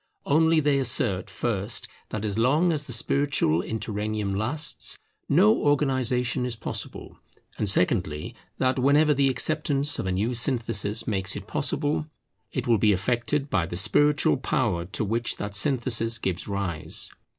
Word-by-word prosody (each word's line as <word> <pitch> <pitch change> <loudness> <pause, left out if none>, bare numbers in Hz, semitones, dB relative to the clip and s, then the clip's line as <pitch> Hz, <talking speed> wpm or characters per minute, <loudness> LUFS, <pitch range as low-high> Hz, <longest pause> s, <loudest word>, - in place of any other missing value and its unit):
Only 160 +2 +4
they 145 -2 +2
assert, 115 -7 0
first, 105 -2 -2 0.2
that 110 0 -4
as 100 -2 -2
long 150 +9 +3
as 150 -2 -3
the - - -6
spiritual 125 - +1
interregnum 105 -1 -3
lasts, 130 +10 -2 0.3
no 105 +1 +5
organization 130 -4 +1
is 125 -1 -2
possible; 110 - -6 0.4
and 105 - +1
secondly, 90 -6 +1 0.2
that 130 0 +1
whenever 145 +3 +4
the 140 -1 +2
acceptance 145 +1 +1
of - - -2
a - - 0
new 105 +7 0
synthesis 115 -3 0
makes 95 -3 -1
it - - -6
possible, 150 +1 -1 0.4
it 130 - -3
will 115 -4 +3
be 105 0 +4
effected 120 +8 0
by 85 -4 +1
the 85 - -5
spiritual 145 +12 +3
power 110 -10 -1
to 100 +4 -3
which 115 +3 0
that 105 -1 -5
synthesis 115 0 +1
gives 95 -5 -3
rise. 90 -6 -2
115 Hz, 150 wpm, -26 LUFS, 100-140 Hz, 0.4 s, no